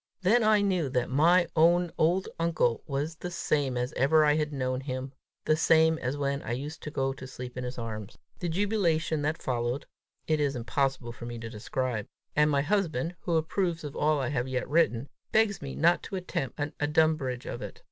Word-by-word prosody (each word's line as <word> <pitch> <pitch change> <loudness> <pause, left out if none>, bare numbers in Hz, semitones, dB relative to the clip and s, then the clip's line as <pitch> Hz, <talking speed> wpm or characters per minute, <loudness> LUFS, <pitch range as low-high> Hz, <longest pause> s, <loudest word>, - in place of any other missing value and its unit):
Then 225 +6 +4
I 215 -1 +5
knew 185 -7 +1
that 125 -1 -1
my 170 +6 +5
own 170 +2 +4
old 175 +4 +2
uncle 160 -8 +1
was 145 +3 -2
the 180 - -5
same 145 -6 0
as 125 +1 -2
ever 155 +3 +4
I 150 - +5
had 150 -1 0
known 130 -2 -2
him, 130 0 -5 0.3
the 155 - +4
same 160 0 +4
as 130 +3 -2
when 140 0 -1
I 120 - -3
used 145 +6 -5
to - - -5
go 135 -2 -1
to 130 -1 -9
sleep 125 -1 -8
in 125 - -4
his 125 +1 -5
arms. 110 -3 -6 0.2
The 175 - -2
jubilation 170 -5 +1
that 155 +2 -1
followed, 120 +1 -1 0.4
it 155 -1 +1
is 145 -2 +1
impossible 125 0 -1
for 120 0 -8
me 120 0 -5
to 115 0 -7
describe; 120 0 -3 0.3
and 150 0 +4
my 140 -1 +2
husband, 170 -3 0
who 170 - -1
approves 165 +1 -1
of 145 -2 -6
all 150 0 +2
I 130 - -1
have 130 -3 -1
yet 130 -1 -2
written, 140 -4 +2 0.2
begs 215 -3 +2
me 140 -1 -6
not 170 +2 +3
to 195 - -6
attempt 155 -8 -3
an 145 +1 -2
adumbration 145 -4 +1
of - - -7
it. - - -7
145 Hz, 205 wpm, -29 LUFS, 130-165 Hz, 0.4 s, I